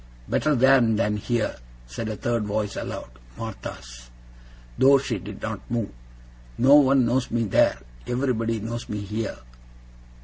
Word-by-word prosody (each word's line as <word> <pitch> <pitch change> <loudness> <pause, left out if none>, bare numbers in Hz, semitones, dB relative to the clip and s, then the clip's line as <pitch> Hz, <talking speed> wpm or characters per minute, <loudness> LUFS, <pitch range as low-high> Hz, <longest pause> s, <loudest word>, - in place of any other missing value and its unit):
'Better 150 -1 +1
there 135 +1 +6
than 110 -2 +1
here,' 115 +2 -1 0.3
said 60 - -5
a 110 - -3
third 115 0 -1
voice 105 0 -2
aloud - - -5 0.3
Martha's, - - -8 0.7
though 140 +1 +6
she 130 -6 -3
did 100 +2 -9
not 110 -2 -3
move. 115 -3 -2 0.7
'No 135 +3 +5
one 135 -3 +6
knows 125 +2 0
me 120 0 0
there. 100 - +3 0.3
Everybody 120 -3 0
knows 115 +2 -5
me 105 -1 -3
here. 105 +3 -4
115 Hz, 140 wpm, -25 LUFS, 105-125 Hz, 0.7 s, there